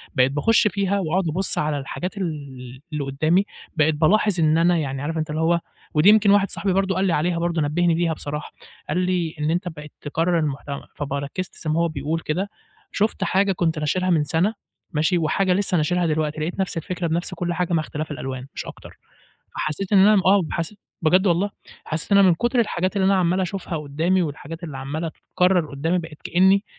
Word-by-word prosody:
بقيت 130 +1 +4
باخش 210 +10 +3
فيها 200 0 0
وأقعد 180 +1 0
أبص 185 +5 -2
على 150 -1 0
الحاجات 180 +8 -5
ال 135 -7 -6
اللي 150 -1 -1
قدامي 155 +8 +1 0.3
بقيت 155 0 +3
بالاحظ 190 +4 +3
إن 155 0 +4
أنا 170 +1 +4
يعني 135 -3 -2
عارف 160 +3 -3
أنت 155 -1 -2
اللي 155 +1 -2
هو 170 +1 +3 0.3
ودي 155 +6 +5
يمكن 210 -1 +6
واحد 200 -1 +4
صاحبي 195 -2 -1
برضه 195 -1 +1
قال 190 +1 +1
لي 175 - +2
عليها 170 +2 +1
برضه 170 -1 0
نبهني 170 +4 +2
بيها 165 -1 +1
بصراحة 150 0 -6 0.4
قال 155 - 0
لي: 180 -3 0
إن 150 +2 0
"أنت 180 +2 -1
بقيت 150 -2 -10
تكرر 165 +3 0
المحتوى" 140 -1 -3
فب 140 -1 -4
ركزت 140 +6 -4
زي 155 - -5
ماهو 170 +2 +2
بيقول 160 0 -2
كده 180 +6 -2 0.4
شُفت 215 +1 0
حاجة 195 +1 +2
كنت 165 -4 0
ناشرها 185 +5 0
من 160 -4 +3
سنة 165 +9 +1 0.4
ماشي 160 +3 +1
وحاجة 180 +3 +1
لسه 185 -2 +1
ناشرها 175 +3 +1
دلوقتي، 155 -1 -1
لقيت 175 +5 -3
نفس 190 -3 -1
الفكرة 175 +1 -3
بنفس 170 +3 -2
كل 175 0 -2
حاجة 175 0 -1
مع 160 - +3
اختلاف 150 0 -5
الألوان 130 -2 -5
مش - - -5
أكتر. - - -11 0.6
فحسيت 180 +7 -3
إن 200 - +7
أنا 200 0 +6
آه 195 0 +5
حسيت 170 +5 -3 0.2
بجد 185 +5 +4
والله 185 +4 +2 0.3
حسيت 165 +5 -3
إن 200 - +7
أنا 195 -2 +7
من 170 - +5
كتر 240 +7 0
الحاجات 185 -3 -1
اللي 190 - +2
أنا 195 - +4
عمال 185 +1 +2
أشوفها 180 -2 -3
قدامي 160 +6 0
والحاجات 165 +2 -6
اللي 150 -5 -6
عمالة 150 +5 -3
تتكرر 180 0 0
قدامي 160 +6 0
بقيت 160 -3 -8
كأني 190 +3 +4
170 Hz, 205 wpm, -23 LUFS, 150-185 Hz, 0.6 s, إن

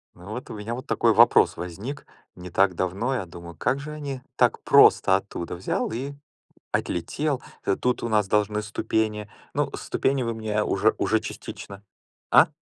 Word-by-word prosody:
Вот 105 +9 -8
у - - -6
меня 110 +2 -5
вот 130 - -8
такой - - +3
вопрос - - +5
возник. 100 - -6 0.3
Не 90 0 -9
так 95 +1 +2
давно 95 +9 -1
я 105 - -2
думаю: 85 0 -11
"Как 120 - 0
же 150 +2 -7
они 140 -4 -5 0.2
так - - +3
просто 95 - +6
оттуда 95 -3 -6
взял, 90 - -2
и 130 +5 -4 0.6
отлетел". 135 - -1 0.4
Тут 125 0 0
у 120 - -1
нас 105 -3 +2
должны 105 +1 +1
ступени. 105 0 -1 0.3
Ну, - - 0
ступени 135 -1 0
вы 115 -1 -2
мне 105 -1 -1
уже - - +2
уже - - +2
частично 100 0 -8 0.5
а? - - +7
105 Hz, 160 wpm, -25 LUFS, 95-125 Hz, 0.6 s, а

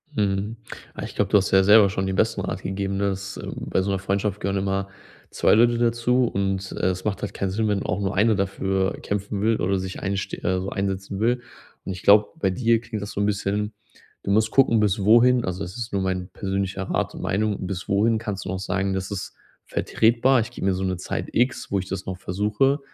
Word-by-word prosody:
Mhm. 105 +2 -1 0.4
Ah, - - -6
ich - - -7
glaube, - - 0
du - - +7
hast 95 - 0
dir 95 - +6
ja 95 - +5
selber 105 0 +7
schon 95 0 -2
den 95 0 -2
besten - - +1
Rat - - -4
gegeben, 95 0 -2
ne, 100 0 +1
dass, 95 +1 -6
äh, - - -7
bei - - -1
so 100 +1 -1
'ner 95 - 0
Freundschaft 100 +1 -1
gehören 100 0 -1
immer 95 0 -1 0.4
2 - - +3
Leute 120 +2 +5
dazu, 120 +1 +2
und 95 -2 -2
es 95 0 -1
macht 105 -2 -1
halt 100 -1 -4
keinen 100 - -2
Sinn, 110 +3 0
wenn 105 - +1
man - - -5
auch 90 +2 -1
nur 100 0 -1
einer 110 +2 +4
dafür 95 -1 -1
kämpfen 100 0 -3
will 110 +1 +1
oder 95 +2 +1
sich 95 0 -6
einsste 100 0 -2
äh, 95 0 +1
so 95 +1 -4
einsetzen 95 0 -3
will. 120 +2 +2 0.4
Und 95 - -3
ich 90 - -9
glaube, 105 +1 +6
bei 95 - +2
dir 115 +4 +2
klingt 115 -3 -6
das 100 - -6
so 100 - -2
'n - - +2
bisschen 105 +1 -1 0.5
du - - -4
musst 110 +2 +3
gucken, 120 -4 +4
bis 105 0 +2
wohin 120 +3 +5
also, 90 +2 -3
es 90 +5 -7
ist 120 -2 -5
nur 100 - +1
mein 95 -1 -2
persönlicher 95 0 -3
Rat - - -2
und - - -7
Meinung, 105 0 -1
bis 90 -1 -5
wohin 110 +3 +3
kannst 105 -4 -4
du - - -5
noch 95 0 -2
sagen: 95 +1 -1
„Das 95 0 -3
ist 100 -2 -5 0.3
vertretbar. 120 +3 +2
Ich 110 - -5
gebe - - -5
mir 95 - +3
so 95 +1 -3
'ne 95 -1 -1
Zeit 90 - -4
X, 125 +2 0
wo 100 - +1
ich 95 - -5
das 95 0 -5
noch 95 -1 -4
versuche.“ 105 +10 +1
100 Hz, 240 wpm, -24 LUFS, 95-110 Hz, 0.5 s, du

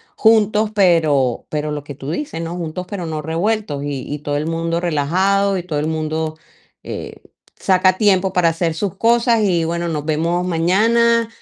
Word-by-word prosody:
juntos, 215 -1 +3
pero 155 - +2
pero 150 0 -2
lo 145 -1 -4
que 145 - -8
tú 135 0 -7
dices, 170 - -4
¿no?, 165 +1 -4
juntos, 175 +1 -5
pero 185 -4 -4
no 155 -1 -4
revueltos. 165 -1 -2
Y 145 -2 -3
y 150 - -3
todo 145 0 -2
el 150 +2 -2
mundo 165 +1 -1
relajado, 185 +5 +1
y 180 - -4
todo 160 -4 -3
el 150 - -1
mundo, 155 0 -2 0.5
eh, - - -6 0.5
saca 185 -1 +3
tiempo 190 -2 +3
para 180 -2 +2
hacer 165 0 -1
sus 190 +4 -3
cosas, 235 +1 +3
y 175 -5 +1
bueno, 170 +1 -2
nos 150 -2 -3
vemos 170 +3 0
mañana, 225 +7 +2
170 Hz, 180 wpm, -19 LUFS, 155-195 Hz, 0.5 s, juntos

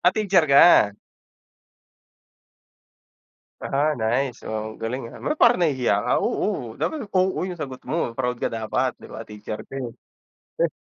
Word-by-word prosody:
Ah, 180 - +5
teacher 190 -7 +3
ka? 140 -7 +6 2.6
Ah, 150 +3 0
nice, 120 +3 -1
oh 110 0 -4
galing, 115 +2 -4
ah. - - -12
Ba't 305 - -2
parang 235 -5 +5
nahihiya 130 -6 +2
ka. - - 0
Oo, 115 -2 -2
dapat 290 -9 -3
oo 185 -1 +1
yung 180 - -5
sagot 130 -5 -6
mo 160 -7 -1
proud 125 0 -2
ka 115 - -2
dapat, 115 +3 -1
'di - - -12
ba? 115 - -8
Teacher 105 0 -7
ka, - - -12
eh. 125 - -3 0.7
Heh. - - +2
130 Hz, 150 wpm, -23 LUFS, 115-175 Hz, 2.6 s, ka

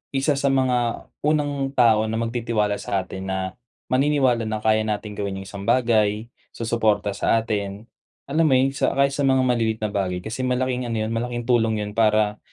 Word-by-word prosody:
isa 135 +3 +2
sa 140 - +1
mga 125 -3 0 0.2
unang 145 -3 0
tao 110 -3 +4
na 110 - -2
magtitiwala 115 -3 -1
sa 95 -1 -2
atin 95 +1 -7
na 95 0 -1 0.5
maniniwala 130 -4 +2
na 110 0 -3
kaya 110 0 +2
natin 105 0 -3
gawin 100 -1 -4
yung - - -13
isang 100 +1 -8
bagay, 110 -2 +2 0.2
susuporta 110 -3 0
sa 100 - +1
atin. 100 -2 -3 0.5
Alam 160 +1 +3
mo 135 - +4
yon, 135 +1 +3
sa 135 - 0
kahit 140 0 +3
sa 140 0 0
mga 130 -1 +3
maliliit 115 -3 +1
na 105 - -1
bagay 90 -3 -2
kasi 115 +4 -6
malaking 125 -1 -1
ano 115 - -3
yon, 110 - -3
malaking 120 +1 -3
tulong 115 -3 +2
yon 105 - -5
para 110 -1 +2
115 Hz, 185 wpm, -23 LUFS, 105-130 Hz, 0.5 s, tao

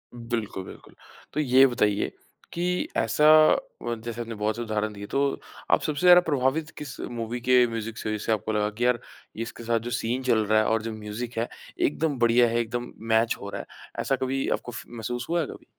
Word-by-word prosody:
बिल्कुल, 115 -5 -4
बिल्कुल। - - -13 0.4
तो - - -1
ये 135 -1 +6
बताइए 105 -4 +1 0.4
कि 180 +1 -1
ऐसा 115 +7 +2 0.6
व 120 0 -2
जैसे 120 0 -4
आपने 115 -1 -5
बहुत 105 +1 -1
से 120 - -5
उदाहरण 110 -1 -2
दिए, 100 0 -8
तो 140 0 0 0.3
आप - - +5
सबसे 150 -2 -2
ज़्यादा 180 0 +9
प्रभावित 150 0 0
किस 150 -3 -7
मूवी 120 0 -4
के 125 0 +5
म्यूज़िक 115 0 -5
से 110 - -4
हुए, 110 - -1
जिससे 110 - -3
आपको 110 0 0
लगा 105 0 +1
कि, 115 +4 -2
"यार, 125 -2 +3 0.4
इसके 115 +1 -6
साथ 115 0 +1
जो 120 +2 -6
सीन 120 +2 -1
चल 110 -4 +2
रहा 110 +1 +4
है 110 - +2
और 110 -1 +2
जो 115 0 -4
म्यूज़िक 110 +3 -6
है, 115 - 0 0.3
एकदम 150 -1 +1
बढ़िया 120 0 +5
है, 115 +1 +1
एकदम 120 +1 -3 0.2
मैच 115 +1 +3
हो 100 - -6
रहा - - -5
है।" - - -14 0.3
ऐसा 135 - +1
कभी 130 +1 -1
आपको 120 - -9
फ़ 120 - -7
महसूस 120 +1 -5
हुआ 170 0 +2
है - - -1
कभी? - - -11
120 Hz, 215 wpm, -26 LUFS, 110-130 Hz, 0.6 s, ज़्यादा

